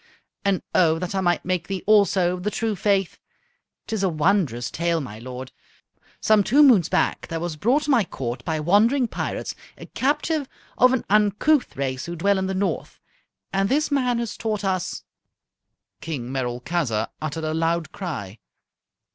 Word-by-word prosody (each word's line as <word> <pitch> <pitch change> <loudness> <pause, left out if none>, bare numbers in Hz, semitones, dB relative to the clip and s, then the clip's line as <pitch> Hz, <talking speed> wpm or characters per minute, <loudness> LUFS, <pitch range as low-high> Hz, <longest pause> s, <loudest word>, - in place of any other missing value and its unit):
And 200 -2 +1
O 165 -3 +4
that 180 +3 -4
I 190 - 0
might 175 -2 +1
make 180 -1 -1
thee 195 -1 -4
also 200 -4 +4
of 180 - -5
the 205 - -1
true 220 0 -2
faith! 195 -1 0 0.7
'Tis 220 -3 -3
a 190 - +2
wondrous 155 - +1
tale, 170 0 0
my 110 -7 -7
lord. 130 +2 -8 0.7
Some 215 -2 +4
two 280 +9 +5
moons 225 - +5
back - - 0
there 165 - -3
was 170 -1 -3
brought 245 - +2
to 295 - 0
my 240 -5 +4
Court 125 -8 -5
by 160 -2 -2
wandering 220 - +3
pirates - - -4 0.2
a - - -10
captive 290 +1 -1 0.3
of 255 0 +5
an 260 - -1
uncouth 210 - +2
race 130 0 -3
who 170 - -4
dwell 195 +4 +2
in 190 - -1
the 190 - -2
north. 190 -3 -2 0.5
And 195 +1 +1
this 300 +3 +1
man 250 -4 +1
has 235 -2 -4
taught 215 -2 -2
us 185 -2 -2 0.5
" - - -56
King 130 -7 -5
Merolchazzar 125 -2 -1
uttered 155 +1 -4
a 155 0 -1
loud 165 -1 0
cry. 115 - -6
185 Hz, 170 wpm, -23 LUFS, 155-215 Hz, 0.7 s, two